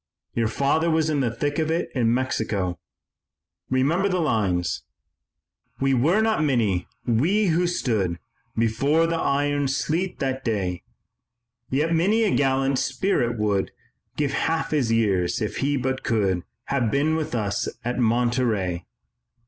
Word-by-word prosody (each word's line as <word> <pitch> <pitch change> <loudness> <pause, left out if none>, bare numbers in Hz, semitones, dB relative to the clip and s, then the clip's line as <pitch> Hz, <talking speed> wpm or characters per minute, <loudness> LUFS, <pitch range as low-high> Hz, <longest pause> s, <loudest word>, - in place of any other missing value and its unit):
Your 115 -1 +1
father 140 +8 +1
was 160 -1 +2
in 145 - +1
the 125 -3 +1
thick 145 +6 -2
of 155 0 0
it 165 +2 -1
in 115 -4 +2
Mexico. 110 -7 -1 0.9
Remember 155 +10 +2
the 185 -1 0
lines: 100 - 0 1.0
"We 135 0 +2
were 160 - +3
not 220 -8 +2
many, 110 - +1 0.2
we 175 - +2
who 175 +2 +2
stood 105 - 0 0.4
Before 135 +9 +2
the 165 0 -1
iron 145 0 +1
sleet 160 +7 -1
that 135 -1 -2
day; 95 -7 -1 0.9
Yet 150 +5 +1
many 200 +8 +3
a 210 - +2
gallant 135 -1 +2
spirit 120 -12 0
would 105 -2 0 0.5
Give 145 -2 0
half 160 0 0
his 135 -7 +1
years 95 -6 +1
if 105 - -3
he 140 +1 +1
but 130 0 -2
could 95 -6 0 0.2
Have 130 -5 0
been 145 +6 +1
with 155 -5 -2
us 105 -3 -1 0.2
at 125 +1 -1
Monterey." 115 -6 +1
130 Hz, 140 wpm, -24 LUFS, 110-155 Hz, 1.0 s, were